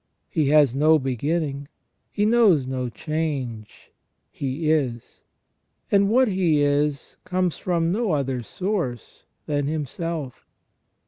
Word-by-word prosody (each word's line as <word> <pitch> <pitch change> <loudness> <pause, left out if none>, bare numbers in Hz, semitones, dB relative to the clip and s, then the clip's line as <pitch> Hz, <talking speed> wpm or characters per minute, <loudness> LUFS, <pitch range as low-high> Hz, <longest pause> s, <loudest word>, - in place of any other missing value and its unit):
He 155 -5 +1
has 145 -3 +5
no 155 +3 +4
beginning; 140 +2 -2 0.4
He 205 - 0
knows 215 - +4
no 130 -1 -3
change; 135 -5 -4 0.4
He 145 +3 -2
is; 125 -7 -2 0.7
and 200 0 +4
what 255 +3 +4
He 175 -7 +2
is 145 0 0
comes 185 -2 -1
from 170 -2 0
no 210 -2 0
other 135 -4 -1
source 170 - -4 0.2
than 145 -2 -1
Himself. 155 -1 -4
150 Hz, 115 wpm, -23 LUFS, 135-175 Hz, 0.7 s, has